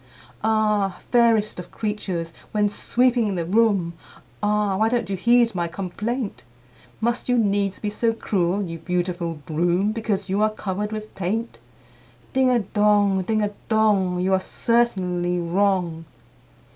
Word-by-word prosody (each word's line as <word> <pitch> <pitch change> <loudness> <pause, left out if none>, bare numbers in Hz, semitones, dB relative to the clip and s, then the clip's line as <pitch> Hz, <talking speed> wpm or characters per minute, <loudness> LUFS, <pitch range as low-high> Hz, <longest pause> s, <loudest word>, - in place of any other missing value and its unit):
Ah! 210 -3 +1
fairest 225 -5 +3
of 180 - -8
creatures, 190 -6 -3 0.2
when 210 -1 +3
sweeping 235 -1 +1
the 170 -2 -2
room, 195 -3 +2 0.5
Ah! 210 -1 +1
why 220 +2 +3
don't 235 -4 -1
you - - 0
heed 235 +4 +3
my 175 -2 -1
complaint? 195 - -4 0.6
Must 235 +2 -1
you 245 - +3
needs 200 -3 +1
be 210 - -3
so 230 +2 +1
cruel, 200 -3 0
you 165 -3 -6
beautiful 175 -1 -2
Broom, 175 +5 +1
Because 215 -3 -2
you 195 +2 0
are 215 - +4
covered 210 0 -4
with 215 0 -6
paint? 215 +6 -3 0.7
Ding 260 -1 +3
a 250 - +4
dong, 205 -1 +2
ding 215 +3 0
a 205 - -1 0.2
dong! 205 -5 +2
You 185 +1 +1
are 190 - +4
certainly 185 -7 0
wrong." 175 -2 0
205 Hz, 145 wpm, -23 LUFS, 180-220 Hz, 0.7 s, are